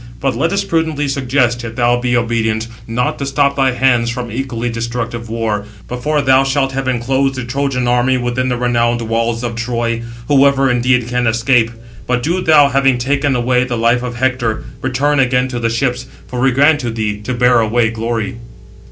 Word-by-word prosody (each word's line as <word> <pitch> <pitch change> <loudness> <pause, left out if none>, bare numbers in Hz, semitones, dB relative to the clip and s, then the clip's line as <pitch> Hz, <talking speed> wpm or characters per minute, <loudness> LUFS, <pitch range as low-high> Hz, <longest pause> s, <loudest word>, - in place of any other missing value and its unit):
But 135 -3 -1
let 160 +8 0
us 200 - 0
prudently 160 -3 -1
suggest, 125 -3 0
if 115 -1 -6
thou 120 0 +2
be 120 0 +1
obedient, 115 -1 -1 0.2
not 120 +2 -1
to 140 - -2
stop 140 0 +1
thy 135 -2 +2
hands 120 -2 +2
from 120 -1 -4
equally 120 -1 -3
destructive 115 0 -4
war, 110 -2 -2 0.2
before 145 +4 -1
thou 135 0 +4
shalt 135 0 0
have 135 0 -3
enclosed 130 +2 0
the 130 - -4
Trojan 125 0 -1
army 125 +1 +2
within 125 +1 -1
the 125 - -1
renowned 120 -1 +1
walls 115 +1 -1
of 120 -1 -3
Troy, 115 0 -2 0.3
whoever, 135 -2 +4
indeed, 125 -1 +1
can 125 -1 0
escape: 115 +1 +2 0.4
but 125 -1 0
do 175 +4 0
thou, 150 -4 +5
having 135 -2 +2
taken 135 +2 0
away 125 +1 +2
the 125 -2 -3
life 115 +2 +2
of 125 -1 -5
Hector, 120 -3 -1 0.2
return 135 +3 0
again 125 -1 +2
to 120 -1 -4
the 115 -1 0
ships; 125 +1 -1 0.2
for 125 - -6
we 135 +2 +3
grant 145 +4 +3
to 120 -4 -3
thee 105 -2 -3
to 125 +4 -3
bear 125 0 +4
away 115 0 +1
glory." 115 +1 -3
125 Hz, 190 wpm, -16 LUFS, 115-135 Hz, 0.4 s, thou